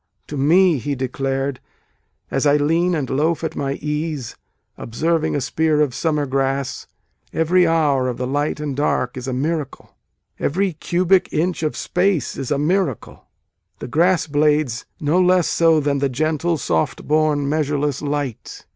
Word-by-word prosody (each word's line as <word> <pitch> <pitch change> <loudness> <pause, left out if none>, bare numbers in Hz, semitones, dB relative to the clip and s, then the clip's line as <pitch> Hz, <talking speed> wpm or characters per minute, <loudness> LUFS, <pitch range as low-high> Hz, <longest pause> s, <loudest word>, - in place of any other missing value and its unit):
"To 150 - -5
me," 165 +3 +4
he 145 +3 -3
declared, 135 +1 -2 0.7
"as 135 +2 +1
I 145 +1 +5
lean 165 +4 +1
and 145 -4 -2
loaf 155 +6 0
at 160 - -3
my 140 -1 -2
ease, 150 -4 -4 0.4
observing 160 +8 -1
a 145 - 0
spear 155 +3 +1
of 145 -4 +2
summer 150 +1 0
grass," 135 0 -2 0.4
Every 175 +2 +3
hour 145 -6 +2
of 125 - -4
the 125 - -2
light 145 +3 -1
and 145 -3 -3
dark 130 -3 0
is 130 0 -6
a - - -1
miracle 145 +2 -3 0.4
Every 185 +4 0
cubic 180 +4 +1
inch 170 +3 -1
of 155 -2 -2
space 180 -2 0
is 135 - -5
a 145 - +1
miracle, 160 - -1 0.5
the - - -7
grass 170 +6 +2
blades 150 -5 +1
no 155 +5 +2
less 180 -1 +3
so 165 -2 +3
than 140 -1 0
the 140 0 +1
"gentle 155 +5 0
soft 80 - -1
born 150 -2 +2
measureless 145 -2 -1
light." 145 -4 -4
150 Hz, 155 wpm, -20 LUFS, 135-165 Hz, 0.7 s, I